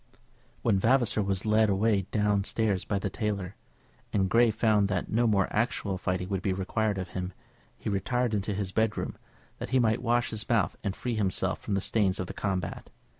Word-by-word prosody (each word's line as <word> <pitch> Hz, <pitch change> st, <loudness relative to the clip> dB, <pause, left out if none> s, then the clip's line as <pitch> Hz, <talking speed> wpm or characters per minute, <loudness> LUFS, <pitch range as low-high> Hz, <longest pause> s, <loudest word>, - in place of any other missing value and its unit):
When 105 Hz, -4 st, +3 dB
Vavasor 120 Hz, 0 st, +3 dB
was 95 Hz, -1 st, -1 dB
led 110 Hz, 0 st, +4 dB
away 100 Hz, -1 st, +2 dB
down 105 Hz, -2 st, +1 dB
stairs 105 Hz, -3 st, 0 dB
by 100 Hz, -, -1 dB
the 100 Hz, -1 st, -2 dB
tailor, 100 Hz, -3 st, -3 dB, 0.6 s
and 95 Hz, -2 st, +1 dB
Grey 120 Hz, 0 st, +5 dB
found 105 Hz, -2 st, +2 dB
that 95 Hz, -3 st, -2 dB
no 120 Hz, +2 st, +3 dB
more 100 Hz, -3 st, +3 dB
actual 105 Hz, -4 st, -1 dB
fighting 90 Hz, 0 st, -1 dB
would 95 Hz, -2 st, -1 dB
be 95 Hz, 0 st, 0 dB
required 100 Hz, +2 st, -1 dB
of 95 Hz, -1 st, -4 dB
him, 90 Hz, +1 st, -4 dB, 0.4 s
he -, -, -8 dB
retired 120 Hz, +4 st, 0 dB
into 100 Hz, 0 st, -1 dB
his 100 Hz, -2 st, -2 dB
bedroom, 110 Hz, +1 st, 0 dB, 0.4 s
that -, -, -5 dB
he 130 Hz, -, +2 dB
might 115 Hz, -2 st, +2 dB
wash 120 Hz, 0 st, +1 dB
his 110 Hz, -1 st, -5 dB
mouth 115 Hz, -4 st, +2 dB
and 100 Hz, -2 st, -2 dB
free 125 Hz, -, -3 dB
himself 100 Hz, -4 st, 0 dB
from 100 Hz, -, -2 dB
the 100 Hz, -, 0 dB
stains 100 Hz, -3 st, +1 dB
of 95 Hz, -, -1 dB
the -, -, -7 dB
combat. 95 Hz, -3 st, -3 dB
105 Hz, 195 wpm, -28 LUFS, 95-110 Hz, 0.6 s, Grey